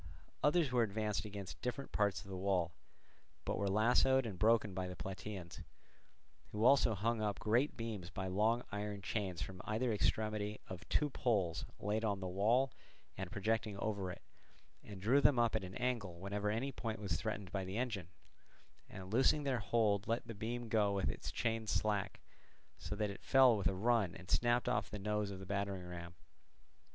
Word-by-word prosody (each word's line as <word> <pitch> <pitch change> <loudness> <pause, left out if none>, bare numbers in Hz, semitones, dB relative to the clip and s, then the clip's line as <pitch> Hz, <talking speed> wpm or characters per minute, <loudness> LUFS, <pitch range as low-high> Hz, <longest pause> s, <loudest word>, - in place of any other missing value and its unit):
Others 150 -1 +3
were 125 -1 +3
advanced 105 -1 -1
against 100 -3 -7
different 130 +3 -3
parts 105 -1 +1
of - - -16
the 95 - -5
wall 90 -3 +1 0.7
but - - 0
were 100 - +1
lassoed 120 +5 +4
and 100 -6 -5
broken 110 -1 +4
by 95 0 -2
the 90 - -6
Plataeans; 95 +1 -6 0.9
who 105 +2 0
also 125 -4 +6
hung 110 +3 0
up 105 -2 0
great 120 +6 +1
beams 110 -7 -4
by 95 0 -4
long 110 +6 +2
iron 105 -1 -4
chains 95 -5 -2
from 95 -1 -7
either 115 +2 0
extremity 105 0 0
of 95 0 -8
two 150 -1 +2
poles 100 - 0
laid 105 +2 -1
on 100 -3 0
the 95 - -4
wall 110 +9 +2 0.4
and 95 -2 -5
projecting 105 +1 -1
over 100 -3 -2
it, 90 - -8 0.6
and 100 -3 -9
drew 130 +7 +5
them 140 -3 +5
up 115 -1 +3
at 110 - 0
an 95 0 -7
angle 115 -9 -2
whenever 100 +2 -2
any 120 +6 -1
point 115 -3 -4
was 100 -5 -1
threatened 100 +1 -3
by 95 -1 -1
the 95 +3 -4
engine, 110 -8 -2 0.8
and 95 +1 -8
loosing 135 +4 +4
their 135 -3 0
hold 105 -1 +1
let 115 +1 0
the 115 - -6
beam 115 +3 -4
go 105 -2 +2
with 95 -8 0
its - - -6
chains 115 -2 -1
slack, 105 -3 0 0.6
so 105 - -4
that 105 -1 -1
it 100 - -10
fell 130 -3 +6
with 100 -4 +1
a 95 - 0
run 110 -3 +2
and 90 - -9
snapped 120 0 +3
off 105 -1 +1
the 105 - -5
nose 105 0 -1
of 100 - -6
the 95 - -8
battering 100 -1 -2
ram. 85 0 -7
105 Hz, 185 wpm, -36 LUFS, 95-115 Hz, 0.9 s, also